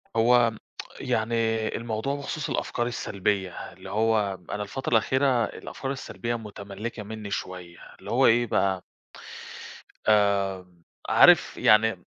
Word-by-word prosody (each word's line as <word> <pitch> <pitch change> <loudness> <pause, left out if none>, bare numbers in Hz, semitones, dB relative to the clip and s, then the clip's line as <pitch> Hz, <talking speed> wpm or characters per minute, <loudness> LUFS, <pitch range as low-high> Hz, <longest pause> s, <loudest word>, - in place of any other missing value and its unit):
هو 120 +1 +4 0.5
يعني 110 +1 -1 0.4
الموضوع 115 +4 -3
بخصوص 145 +1 -4
الأفكار 120 0 -1
السلبية، 100 -5 -2 0.2
اللي 95 +1 -11
هو 105 -2 +1
أنا 105 - -2
الفترة 125 +6 -5
الأخيرة 130 +1 +3
الأفكار 135 +5 -6
السلبية 120 -3 -4
متملكة 105 0 -7
مني 105 -1 -7
شوية 90 -3 -6 0.2
اللي - - -8
هو - - +4
إيه 120 +2 +4
بقى. 95 -3 0 1.2
آمم 95 -4 +1 0.3
عارف - - +6
يعني 110 -4 +3
110 Hz, 115 wpm, -26 LUFS, 100-120 Hz, 1.2 s, عارف